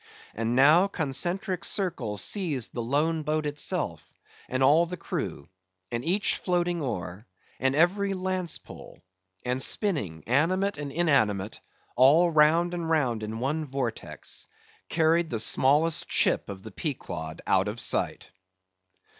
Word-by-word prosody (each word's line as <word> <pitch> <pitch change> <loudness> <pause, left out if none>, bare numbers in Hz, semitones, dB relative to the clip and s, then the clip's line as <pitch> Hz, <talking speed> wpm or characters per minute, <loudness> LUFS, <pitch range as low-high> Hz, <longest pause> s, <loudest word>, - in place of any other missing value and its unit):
And 115 +2 -2
now, 155 +8 +6
concentric 180 +4 -1
circles 130 - -1
seized 160 - -1
the 120 - -3
lone 150 +7 0
boat 155 +1 -1
itself, 145 0 -2 0.5
and 130 +1 0
all 165 +6 +4
its - - -2
crew, 70 - -5 0.4
and 120 0 -3
each 190 +5 +3
floating 175 -2 -1
oar, 100 -5 -5 0.3
and 135 +1 +1
every 195 +5 +2
lance 185 -2 -2
pole, - - -14 0.4
and 125 +1 -1
spinning, 130 - -1
animate 175 - +1
and 145 -1 -5
inanimate, 110 - +1 0.4
all 160 +7 +5
round 165 +3 +4
and 170 -2 -3
round 130 -9 +1
in 110 +1 -5
one 145 +6 -1
vortex, 130 -5 -4 0.4
carried 165 +1 +2
the 115 - -2
smallest 145 +8 +3
chip - - +2
of 95 -1 -8
the 110 - -9
Pequod 85 - -5
out 95 +1 +2
of 105 +3 -4
sight. - - -1
150 Hz, 135 wpm, -27 LUFS, 120-175 Hz, 0.5 s, now